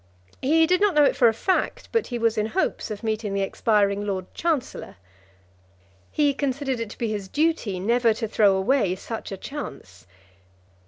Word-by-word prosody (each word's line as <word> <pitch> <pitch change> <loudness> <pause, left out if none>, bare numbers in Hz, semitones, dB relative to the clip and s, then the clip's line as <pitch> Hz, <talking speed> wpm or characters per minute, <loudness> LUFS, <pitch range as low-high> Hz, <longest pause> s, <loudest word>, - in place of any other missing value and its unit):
He 320 +4 +4
did 365 +3 +2
not 410 -5 +3
know 300 - +6
it - - +3
for 240 - +5
a 225 - +3
fact, 375 - -1
but 455 - 0
he 245 - -3
was 230 -1 +1
in 215 -1 0
hopes 375 +11 -1
of 210 0 -6
meeting 215 -2 -2
the 195 - +1
expiring 200 0 +1
Lord 190 -3 -3
Chancellor. 315 -6 -2 1.2
He 290 -2 +2
considered 270 -2 -2
it 230 -2 -4
to - - -11
be 230 - -2
his 205 -3 -4
duty 290 - 0
never 235 +4 +2
to 225 0 -3
throw 205 -2 +3
away 190 -1 +1
such 220 +3 -7
a 195 - -5
chance. 140 - -8
230 Hz, 180 wpm, -24 LUFS, 205-285 Hz, 1.2 s, know